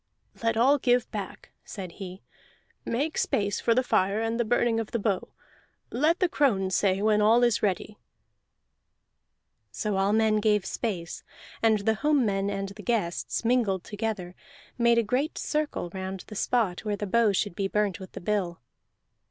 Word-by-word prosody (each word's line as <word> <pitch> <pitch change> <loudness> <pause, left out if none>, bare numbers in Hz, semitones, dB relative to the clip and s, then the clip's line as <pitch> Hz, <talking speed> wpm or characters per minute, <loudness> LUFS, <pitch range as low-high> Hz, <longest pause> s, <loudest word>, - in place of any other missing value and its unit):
"Let 230 -1 +1
all 275 +5 +4
give 245 -2 +2
back," 200 -3 -7
said 185 -4 -7
he. 185 0 -9 0.6
"Make 290 +7 -1
space 200 -1 0
for 230 - +2
the 255 - +3
fire 200 -3 +1
and 225 +1 -1
the - - +3
burning 235 0 +1
of 225 - -4
the 235 - -1
bow. 200 -4 -1 0.6
Let 310 +7 +2
the 365 - +3
crone 205 - +1
say 195 +1 +1
when 210 -1 +3
all 225 +3 +5
is 240 -3 +3
ready." 205 +1 -2 1.7
So 210 -2 -2
all 195 +1 +2
men 220 0 +3
gave 210 -2 +2
space; 180 -8 -4 0.4
and 220 -2 +3
the 220 - +4
home 295 -4 +3
men 195 -1 0
and 195 -1 -3
the 205 +2 -10
guests, 210 -2 -1
mingled 225 -7 +2
together, 205 -4 -4 0.4
made 235 -1 +3
a 235 - +4
great 265 +8 -1
circle 300 - -2
round 190 0 -5
the 215 - -10
spot 210 -4 0
where 210 -1 -2
the 205 - -3
bow 225 +2 +3
should 200 0 -1
be 195 +2 -1
burnt 205 -2 0
with 190 -1 -10
the - - -7
bill. 180 -3 -1
210 Hz, 170 wpm, -27 LUFS, 195-235 Hz, 1.7 s, all